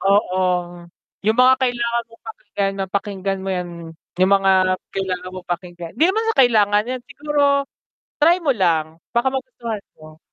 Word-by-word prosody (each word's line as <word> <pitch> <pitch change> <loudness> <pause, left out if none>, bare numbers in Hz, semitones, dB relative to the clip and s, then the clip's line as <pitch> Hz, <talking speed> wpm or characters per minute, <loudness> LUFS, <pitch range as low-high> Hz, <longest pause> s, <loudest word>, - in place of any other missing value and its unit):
Oo, 195 -1 +2 0.9
yung 220 +1 +3
mga 255 +1 +7
kailangan 235 -2 0
mong 230 0 -20
pakinggan, 205 - -3
mapakinggan 195 0 -2
mo - - -4
yan, 180 -1 -3 0.5
yung 185 +2 +4
mga 195 -1 +4 0.4
kailangan 185 -1 -3
mong 185 -1 -9
pakinggan, 175 -1 -5
'di 300 - +3
naman 440 +4 0
sa - - -14
kailangan 210 -3 +3
yan, 255 - -3
siguro 290 +1 -2 0.8
try 340 +4 +6
mo 290 -5 +2
lang 165 -5 +1 0.2
baka 240 +2 +2
magustuhan 235 -5 -5 0.2
mo. 155 0 -14
205 Hz, 150 wpm, -20 LUFS, 185-250 Hz, 0.9 s, mga